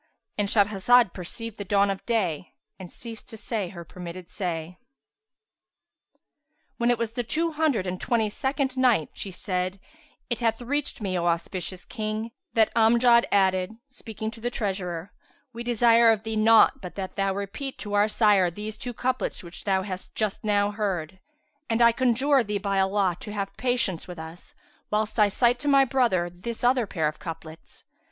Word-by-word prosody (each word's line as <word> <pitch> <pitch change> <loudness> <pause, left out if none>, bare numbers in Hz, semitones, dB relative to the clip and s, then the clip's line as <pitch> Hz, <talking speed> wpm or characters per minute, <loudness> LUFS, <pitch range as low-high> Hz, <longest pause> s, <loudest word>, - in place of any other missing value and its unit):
"—And 205 -1 0
Shahrazad 210 +1 +4
perceived 225 +5 -7
the - - -2
dawn 200 +1 +2
of 195 - -5
day 185 - -1 0.2
and 185 -2 -9
ceased 230 -2 -7
to 225 - -5
say 210 -4 -3
her 170 -2 -9
permitted 180 +1 -9
say. 175 -3 -4 2.0
When 235 0 +1
it 240 - +3
was 230 -1 -2
ad - - -30
the 245 - 0
Two 325 +8 0
Hundred 300 -10 +1
and 180 0 -4
Twenty 230 -4 +1
second 265 +4 -2
Night, 245 - +2
She 200 - -5
said, 185 0 -3 0.5
It 240 - -2
hath 225 -2 +1
reached 275 +1 -2
me, 190 -3 -2
O 170 - 0
auspicious 175 +2 -2
King, 215 0 -4 0.2
that 220 -1 +3
Amjad 235 +1 +5
added, 190 +1 +2
speaking 220 -3 -6
to 225 0 -13
the 240 - -1
treasurer, 190 -6 -3 0.4
"We 235 - -7
desire 235 -1 +5
of 220 -1 0
thee 220 0 -3
naught 220 0 +5
but 180 -2 -8
that 190 -2 -5
thou 195 -1 0
repeat 200 +8 -5
to 205 -1 -5
our 205 +1 +4
sire 210 -4 +4
these 210 +5 -6
two 245 -2 -5
couplets 255 -3 -2
which 170 0 -9
thou 190 -2 +1
hast 185 -1 -7
just 215 -3 -1
now 205 -1 +2
heard; 190 -4 -3 0.5
and 225 0 +1
I 235 -1 +7
conjure 260 +3 +2
thee 210 -1 -2
by 200 -1 -1
Allah 190 -2 +1
to 210 - -8
have 200 -1 -4
patience 245 -8 0
with 180 -1 -8
us, 160 +2 -10 0.3
whilst 215 +1 -1
I 210 - +6
cite 240 +4 +2
to 290 - -5
my 275 -1 +6
brother 235 -9 +1
this 225 +8 -7
other 245 -2 +3
pair 160 -6 0
of 155 - -5
couplets." 165 -1 -9
210 Hz, 180 wpm, -26 LUFS, 185-235 Hz, 2.0 s, I